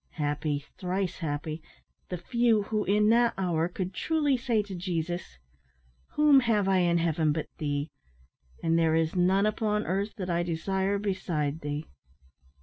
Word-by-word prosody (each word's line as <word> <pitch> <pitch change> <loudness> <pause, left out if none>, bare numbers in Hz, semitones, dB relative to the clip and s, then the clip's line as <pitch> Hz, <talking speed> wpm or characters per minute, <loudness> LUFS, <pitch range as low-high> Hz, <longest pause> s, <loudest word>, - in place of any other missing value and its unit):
Happy, 145 -1 -2
thrice 185 -1 -2
happy, 155 0 -3 0.5
the 180 - -3
few 230 +2 +2
who 215 +1 -1
in 210 +2 +3
that 235 +1 +4
hour 170 -3 0
could 185 +1 -4
truly 295 - +1
say 235 -3 0
to 200 -1 -9
Jesus, 175 - -3 0.8
"Whom 300 -2 +6
have 220 -6 +1
I 190 -1 +3
in 170 -1 +3
heaven 160 -2 +1
but 155 +1 -2
Thee? 145 0 -2 0.7
and 165 0 +2
there 160 -1 +3
is 160 +1 +1
none 185 +3 +3
upon 215 0 0
earth 200 +4 -2
that 185 -3 -4
I 170 -1 +1
desire 190 +4 -1
beside 170 -7 -2
Thee." 145 +1 -4
180 Hz, 150 wpm, -28 LUFS, 160-210 Hz, 0.8 s, Whom